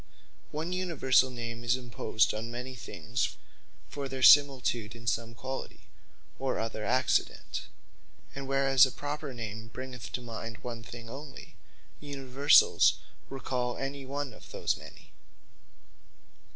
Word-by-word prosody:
One 160 Hz, +4 st, -3 dB
Universall 155 Hz, -8 st, +3 dB
name 115 Hz, -1 st, -5 dB
is 120 Hz, +1 st, +3 dB
imposed 120 Hz, -3 st, +1 dB
on 110 Hz, +2 st, -4 dB
many 125 Hz, +2 st, -5 dB
things, 125 Hz, 0 st, -3 dB, 0.5 s
for 140 Hz, -1 st, -5 dB
their 130 Hz, 0 st, -4 dB
similitude 130 Hz, -7 st, +6 dB
in 115 Hz, 0 st, -12 dB
some 115 Hz, 0 st, -1 dB
quality, 130 Hz, +3 st, -6 dB, 0.6 s
or 135 Hz, -1 st, -1 dB
other 110 Hz, -1 st, -3 dB
accident: 130 Hz, +4 st, 0 dB, 0.7 s
And 135 Hz, 0 st, -6 dB
whereas 135 Hz, -1 st, +5 dB
a -, -, -6 dB
Proper 145 Hz, +1 st, -4 dB
Name 110 Hz, -2 st, -6 dB
bringeth 130 Hz, 0 st, -8 dB
to 125 Hz, -, -2 dB
mind 115 Hz, -1 st, -6 dB
one 120 Hz, -2 st, -5 dB
thing 115 Hz, 0 st, -9 dB
onely; 135 Hz, +3 st, -9 dB, 0.5 s
Universals 140 Hz, 0 st, +4 dB, 0.3 s
recall 125 Hz, -2 st, -2 dB
any 135 Hz, 0 st, -4 dB
one 140 Hz, -1 st, -4 dB
of -, -, -14 dB
those -, -, 0 dB
many. -, -, -13 dB
130 Hz, 125 wpm, -30 LUFS, 115-135 Hz, 0.7 s, similitude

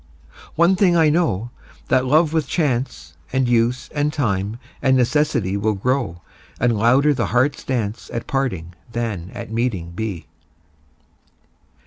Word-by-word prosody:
One 170 Hz, +3 st, +4 dB
thing 180 Hz, -2 st, +3 dB
I 160 Hz, -2 st, +5 dB
know, 120 Hz, -, 0 dB, 0.4 s
that 130 Hz, 0 st, +3 dB
love 155 Hz, +3 st, +3 dB
with 160 Hz, -4 st, +1 dB
chance 125 Hz, -, -1 dB, 0.2 s
And 130 Hz, -1 st, +1 dB
use 120 Hz, +1 st, +1 dB
and 150 Hz, 0 st, 0 dB
time 105 Hz, -7 st, -1 dB, 0.2 s
and 130 Hz, -1 st, +4 dB
necessity 125 Hz, -6 st, +1 dB
Will 105 Hz, +1 st, 0 dB
grow, 100 Hz, -6 st, -1 dB, 0.4 s
and 120 Hz, -1 st, +2 dB
louder 130 Hz, +7 st, +4 dB
the 120 Hz, -7 st, -1 dB
heart's 130 Hz, +4 st, +1 dB
dance 115 Hz, -4 st, -3 dB
At 115 Hz, -, -4 dB
parting 95 Hz, -12 st, -2 dB, 0.2 s
than 110 Hz, -7 st, -3 dB
at 115 Hz, -2 st, -7 dB
meeting 110 Hz, -8 st, -1 dB
be. 95 Hz, -2 st, -4 dB
120 Hz, 135 wpm, -21 LUFS, 105-140 Hz, 0.4 s, I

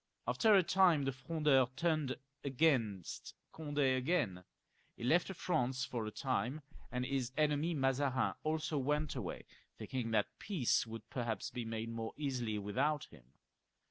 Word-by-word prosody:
After 220 Hz, -2 st, +5 dB
a 190 Hz, -, +6 dB
time 175 Hz, -4 st, +4 dB
the 135 Hz, -, +1 dB
Frondeurs 135 Hz, -2 st, +2 dB
turned 155 Hz, -3 st, +1 dB, 0.3 s
against 125 Hz, -, 0 dB, 0.2 s
Cond^ 145 Hz, -2 st, -6 dB, 0.2 s
again; 130 Hz, -, 0 dB, 0.5 s
he -, -, -8 dB
left 170 Hz, +9 st, +3 dB
France 130 Hz, -6 st, 0 dB
for 115 Hz, -5 st, -3 dB
a -, -, -4 dB
time, 130 Hz, +4 st, -1 dB, 0.3 s
and 125 Hz, 0 st, -1 dB
his 130 Hz, -2 st, -1 dB
enemy 155 Hz, +2 st, +2 dB
Mazarin 135 Hz, -1 st, +1 dB
also 155 Hz, -1 st, -1 dB
went 150 Hz, +2 st, 0 dB
away, 110 Hz, -9 st, -5 dB, 0.3 s
thinking 125 Hz, -3 st, -3 dB
that 110 Hz, -2 st, 0 dB
peace 155 Hz, -, +1 dB
would 110 Hz, -1 st, -8 dB
perhaps 115 Hz, -5 st, -2 dB
be 120 Hz, -2 st, -4 dB
made 115 Hz, 0 st, -3 dB
more 115 Hz, -1 st, -4 dB
easily 125 Hz, -7 st, -1 dB
without 120 Hz, +9 st, 0 dB
him. 65 Hz, -4 st, -18 dB
130 Hz, 140 wpm, -36 LUFS, 115-155 Hz, 0.5 s, a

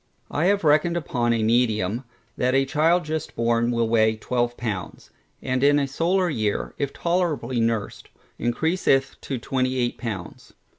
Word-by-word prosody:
I 150 Hz, -, 0 dB
have 200 Hz, 0 st, +2 dB
reckoned 155 Hz, +3 st, +3 dB
upon 120 Hz, -7 st, -1 dB
a 115 Hz, -1 st, +1 dB
medium, 110 Hz, -1 st, +1 dB, 0.3 s
that 125 Hz, +1 st, +1 dB
a 135 Hz, 0 st, +3 dB
child 160 Hz, +5 st, +2 dB
just 155 Hz, 0 st, -4 dB
born 115 Hz, 0 st, +1 dB
will 115 Hz, -1 st, +1 dB
weigh 110 Hz, -1 st, +3 dB
12 120 Hz, +2 st, -2 dB
pounds, 105 Hz, -6 st, -5 dB, 0.3 s
and 130 Hz, +1 st, -1 dB
in 145 Hz, +1 st, +5 dB
a 140 Hz, -1 st, +1 dB
solar 175 Hz, +7 st, +1 dB
year, 110 Hz, -10 st, -2 dB
if 140 Hz, -1 st, -1 dB
tolerably 155 Hz, -9 st, -1 dB
nursed, 115 Hz, -2 st, -2 dB, 0.3 s
encreaseth 135 Hz, +2 st, +1 dB
to 135 Hz, -, -4 dB
28 130 Hz, 0 st, -1 dB
pounds. 105 Hz, -8 st, -7 dB
130 Hz, 150 wpm, -24 LUFS, 115-150 Hz, 0.3 s, in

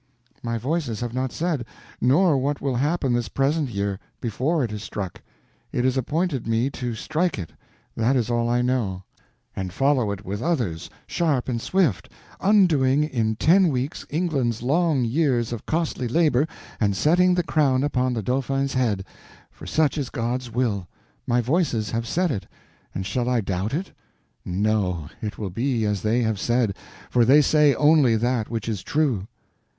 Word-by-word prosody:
"My 115 Hz, -1 st, -2 dB
Voices 130 Hz, -2 st, -2 dB
have 120 Hz, -1 st, -3 dB
not 130 Hz, 0 st, -1 dB
said; 160 Hz, -6 st, -1 dB, 0.4 s
nor 150 Hz, +6 st, +4 dB
what 140 Hz, +2 st, -1 dB
will 135 Hz, -2 st, -1 dB
happen 145 Hz, -1 st, +1 dB
this 120 Hz, -3 st, -1 dB
present 140 Hz, +1 st, 0 dB
year, 100 Hz, -2 st, -2 dB, 0.2 s
before 135 Hz, +7 st, 0 dB
it 115 Hz, -, -2 dB
is 105 Hz, -1 st, -5 dB
struck. 100 Hz, -4 st, -6 dB, 0.5 s
It 125 Hz, -, 0 dB
is 130 Hz, 0 st, +2 dB
appointed 145 Hz, +1 st, -1 dB
me 115 Hz, +4 st, +1 dB
to 120 Hz, -3 st, -4 dB
strike 165 Hz, +8 st, -1 dB
it, 85 Hz, -5 st, -6 dB, 0.4 s
that 115 Hz, +4 st, +2 dB
is 120 Hz, -4 st, +1 dB
all 120 Hz, 0 st, +1 dB
I 120 Hz, +1 st, +2 dB
know; 110 Hz, -7 st, -1 dB, 0.5 s
and 95 Hz, -1 st, -4 dB
follow 135 Hz, 0 st, +2 dB
it 100 Hz, -1 st, -5 dB
with 100 Hz, +3 st, -4 dB
others, 120 Hz, -, -1 dB, 0.2 s
sharp 150 Hz, -7 st, 0 dB
and 120 Hz, -3 st, -2 dB
swift, 165 Hz, -, +1 dB, 0.3 s
undoing 155 Hz, -9 st, +4 dB
in 115 Hz, -7 st, -1 dB
ten 180 Hz, -, +4 dB
weeks 135 Hz, -1 st, -2 dB
England's 140 Hz, -9 st, -1 dB
long 150 Hz, 0 st, +2 dB
years 120 Hz, -3 st, +1 dB
of 115 Hz, -, -7 dB
costly 155 Hz, -6 st, -1 dB
labor, 150 Hz, +1 st, +2 dB, 0.3 s
and 100 Hz, -3 st, +1 dB
setting 180 Hz, -, +4 dB
the 175 Hz, -, +1 dB
crown 135 Hz, -5 st, +2 dB
upon 130 Hz, -3 st, 0 dB
the 110 Hz, -, -2 dB
Dauphin's 135 Hz, +3 st, -1 dB
head—for 105 Hz, -8 st, -4 dB
such 155 Hz, -, +1 dB
is 135 Hz, -3 st, -3 dB
God's 120 Hz, +2 st, -3 dB
will; 110 Hz, -6 st, -1 dB, 0.4 s
my 120 Hz, 0 st, +2 dB
Voices 125 Hz, -, 0 dB
have 115 Hz, 0 st, -2 dB
said 175 Hz, +6 st, +1 dB
it, 100 Hz, -, -4 dB, 0.5 s
and 95 Hz, -, -3 dB
shall 120 Hz, +5 st, -1 dB
I 125 Hz, -1 st, +2 dB
doubt 95 Hz, +3 st, -2 dB
it? 180 Hz, +4 st, -4 dB, 0.5 s
No; 90 Hz, -4 st, -1 dB
it 105 Hz, -1 st, -4 dB
will 100 Hz, -4 st, -4 dB
be 115 Hz, +2 st, 0 dB
as 105 Hz, -2 st, -1 dB
they 115 Hz, +4 st, +1 dB
have 110 Hz, -3 st, -1 dB
said, 120 Hz, -4 st, +1 dB, 0.4 s
for 120 Hz, -, +4 dB
they 135 Hz, +6 st, +6 dB
say 150 Hz, -1 st, +4 dB
only 145 Hz, -6 st, +4 dB
that 120 Hz, 0 st, 0 dB
which 115 Hz, 0 st, -4 dB
is 105 Hz, -5 st, -2 dB
true." 130 Hz, -10 st, 0 dB
125 Hz, 170 wpm, -24 LUFS, 110-145 Hz, 0.5 s, they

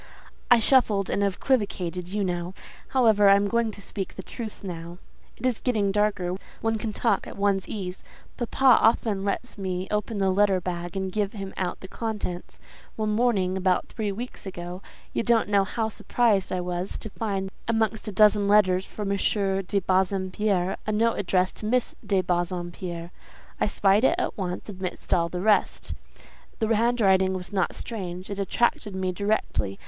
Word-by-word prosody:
"I 245 Hz, -, +8 dB
shuffled 220 Hz, -5 st, +3 dB
and 200 Hz, -, +1 dB
equivocated, 190 Hz, -4 st, -1 dB
you 205 Hz, +1 st, -1 dB
know. 175 Hz, 0 st, -3 dB, 0.3 s
However, 220 Hz, -6 st, +5 dB
I 195 Hz, -, +8 dB
am 200 Hz, 0 st, +2 dB
going 235 Hz, +1 st, +1 dB
to 205 Hz, -1 st, -9 dB
speak 195 Hz, -3 st, -5 dB
the 190 Hz, -, -7 dB
truth 220 Hz, 0 st, -7 dB
now; 170 Hz, -2 st, -6 dB, 0.4 s
it -, -, -6 dB
is 250 Hz, -3 st, +1 dB
getting 215 Hz, -6 st, +1 dB
darker; 195 Hz, -3 st, 0 dB, 0.2 s
one 225 Hz, -1 st, 0 dB
can 220 Hz, 0 st, -3 dB
talk -, -, 0 dB
at -, -, -9 dB
one's 200 Hz, -1 st, +1 dB
ease. 190 Hz, -3 st, -5 dB, 0.3 s
Papa 255 Hz, +1 st, +4 dB
often 220 Hz, -3 st, +3 dB
lets 205 Hz, +3 st, -3 dB
me 185 Hz, -1 st, -3 dB
open 210 Hz, +1 st, -1 dB
the 195 Hz, -1 st, +2 dB
letter 195 Hz, -1 st, +3 dB
bag 175 Hz, 0 st, -4 dB
and 190 Hz, -1 st, -2 dB
give 205 Hz, +1 st, -1 dB
him 195 Hz, -3 st, -6 dB
out 180 Hz, -2 st, -3 dB
the 190 Hz, -, -8 dB
contents. 210 Hz, -5 st, -5 dB, 0.4 s
One 215 Hz, -1 st, -1 dB
morning, 210 Hz, -5 st, +2 dB
about 185 Hz, -1 st, +1 dB
three 215 Hz, -3 st, -2 dB
weeks 230 Hz, 0 st, -7 dB
ago, 175 Hz, 0 st, -6 dB, 0.3 s
you -, -, +1 dB
don't 230 Hz, -2 st, +3 dB
know 200 Hz, -1 st, +4 dB
how 220 Hz, +3 st, -2 dB
surprised 220 Hz, -2 st, +1 dB
I 185 Hz, -, -1 dB
was 180 Hz, +1 st, -3 dB
to 220 Hz, -, -8 dB
find, 195 Hz, -3 st, -3 dB, 0.2 s
amongst 225 Hz, -1 st, 0 dB
a -, -, -2 dB
dozen 205 Hz, 0 st, +4 dB
letters 190 Hz, -2 st, +4 dB
for 210 Hz, -, -6 dB
M. 200 Hz, 0 st, 0 dB
de 195 Hz, -1 st, 0 dB
Bassompierre, 190 Hz, 0 st, +1 dB
a -, -, +1 dB
note 225 Hz, +2 st, +2 dB
addressed 185 Hz, -1 st, +1 dB
to 210 Hz, -, -4 dB
Miss 250 Hz, +2 st, +1 dB
de 200 Hz, -3 st, +2 dB
Bassompierre. 175 Hz, -1 st, -3 dB, 0.5 s
I -, -, +2 dB
spied 200 Hz, +1 st, +3 dB
it -, -, +4 dB
at -, -, -1 dB
once, 180 Hz, -3 st, -4 dB
amidst 190 Hz, -3 st, -4 dB
all 170 Hz, -2 st, +2 dB
the 180 Hz, +1 st, -4 dB
rest; 210 Hz, +1 st, +2 dB, 0.6 s
the 225 Hz, -1 st, +1 dB
handwriting 200 Hz, -5 st, +3 dB
was 185 Hz, +2 st, -5 dB
not 190 Hz, -3 st, 0 dB
strange; 185 Hz, -4 st, -6 dB
it 200 Hz, -, -4 dB
attracted 210 Hz, 0 st, 0 dB
me 185 Hz, -1 st, -1 dB
directly. 180 Hz, -, -1 dB
200 Hz, 175 wpm, -26 LUFS, 185-215 Hz, 0.6 s, I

